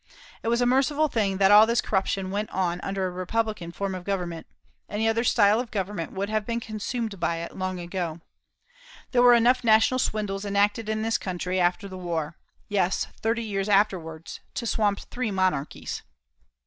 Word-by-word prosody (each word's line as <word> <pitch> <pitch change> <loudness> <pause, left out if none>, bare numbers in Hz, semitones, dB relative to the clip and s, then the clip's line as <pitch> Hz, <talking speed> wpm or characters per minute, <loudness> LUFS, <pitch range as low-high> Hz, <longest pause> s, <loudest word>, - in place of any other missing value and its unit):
It - - -6
was 235 +1 +2
a - - +3
merciful 275 +5 +3
thing 200 -6 0
that 195 0 +5
all 210 +2 +8
this 235 +1 +2
corruption 190 -1 -1
went 205 +2 -2
on 180 -1 -1
under 195 -1 -2
a 185 - -2
republican 185 0 -2
form 195 +2 -3
of 185 -1 -6
government. 180 -4 -3 0.4
Any 220 +2 0
other 225 +1 +2
style 215 -2 +4
of 245 -1 -4
government 195 -4 -3
would 195 +1 -3
have 215 0 -1
been 235 +2 -2
consumed 220 -1 -4
by 170 0 0
it 165 0 -6
long 185 -1 -3
ago. 175 -2 -4 0.9
There 245 - +4
were 245 -1 +8
enough 245 +2 +3
national 225 +3 +4
swindles 210 -4 -1
enacted 205 +2 +1
in 220 0 -1
this 225 0 +1
country 185 0 -2
after 180 +3 +1
the 185 -1 -8
war 165 -3 -3 0.3
yes, 190 -2 0
thirty 230 +1 0
years 200 -2 -2
afterwards 175 -6 0 0.2
to 235 - -3
swamp 210 -3 +1
three 250 -2 -4
monarchies. 185 -7 -1
200 Hz, 180 wpm, -26 LUFS, 185-225 Hz, 0.9 s, all